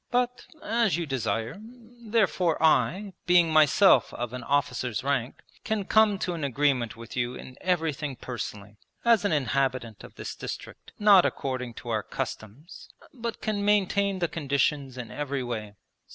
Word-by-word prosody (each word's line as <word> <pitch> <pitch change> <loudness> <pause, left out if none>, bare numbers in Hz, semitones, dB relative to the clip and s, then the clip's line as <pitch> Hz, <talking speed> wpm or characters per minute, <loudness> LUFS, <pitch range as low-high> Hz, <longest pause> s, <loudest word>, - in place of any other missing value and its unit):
But, 250 0 -1 0.2
as 225 -6 +1
you 170 - -2
desire, 115 - -2
therefore 225 -6 -1
I, 190 +5 +2
being 175 -2 +5
myself 155 +6 +5
of 120 0 -4
an 125 - -5
officer's 125 -3 -1
rank, 135 -3 -2 0.2
can 215 -3 -1
come 215 -1 +4
to 180 - -2
an 165 -3 -5
agreement 130 -4 0
with 115 -1 -10
you 120 0 -1
in 130 - -10
everything 155 -6 -1
personally, 105 -4 -7 0.3
as 230 -3 +4
an 205 - +2
inhabitant 130 -5 -1
of - - -13
this - - -6
district, - - -8
not 205 -3 +7
according 125 -3 -3
to 120 - -9
our 110 -2 0
customs, 110 - -7 0.2
but 235 -3 -5
can 210 -2 -1
maintain 200 -1 +2
the 175 -2 0
conditions 140 -3 -1
in 120 -2 -7
every 140 -2 -3
way....' 110 -4 -5
145 Hz, 150 wpm, -27 LUFS, 125-200 Hz, 0.3 s, not